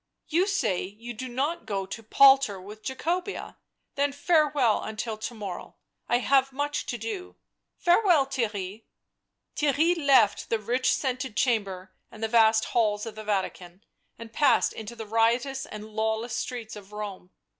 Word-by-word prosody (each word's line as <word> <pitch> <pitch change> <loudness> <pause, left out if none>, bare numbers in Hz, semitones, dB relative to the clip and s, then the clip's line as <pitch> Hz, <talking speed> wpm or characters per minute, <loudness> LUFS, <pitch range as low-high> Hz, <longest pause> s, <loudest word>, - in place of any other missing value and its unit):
You 350 +5 +2
say 390 - 0
you 220 +6 -8
do 255 +3 -6
not 270 +1 -2
go 195 -2 -2
to 195 +4 -7
palter 270 -2 +5
with 210 +3 -11
Jacobea, 350 +8 -3 0.4
then 285 0 +1
farewell 290 -5 +2
until 220 +1 -4
to 230 - -5
morrow; 200 -5 -7 0.3
I 240 - +4
have 270 +2 +2
much 290 +2 -2
to 240 - -3
do... 300 - -6 0.4
farewell, 350 -5 +4
Their 265 -5 -1
ry." 200 +1 -6 0.7
Theirry 300 +4 +2
left 255 -7 +4
thG 220 -2 -2
rich 250 +2 +2
scented 255 -4 -2
chamber 195 -7 0 0.2
and 220 - -10
the - - +2
vast 220 -1 +4
halls 210 -3 +1
of 225 - -6
the 215 0 -8
Vatican 190 -2 -3 0.3
and 230 0 -10
passed 290 - +3
into 220 +2 -8
the 225 - -7
riotous 235 +5 +1
and 215 0 -8
lawless 220 +2 -1
streets 235 -4 -5
of 205 -2 -11
Home. 205 -3 -7
230 Hz, 155 wpm, -27 LUFS, 210-275 Hz, 0.7 s, palter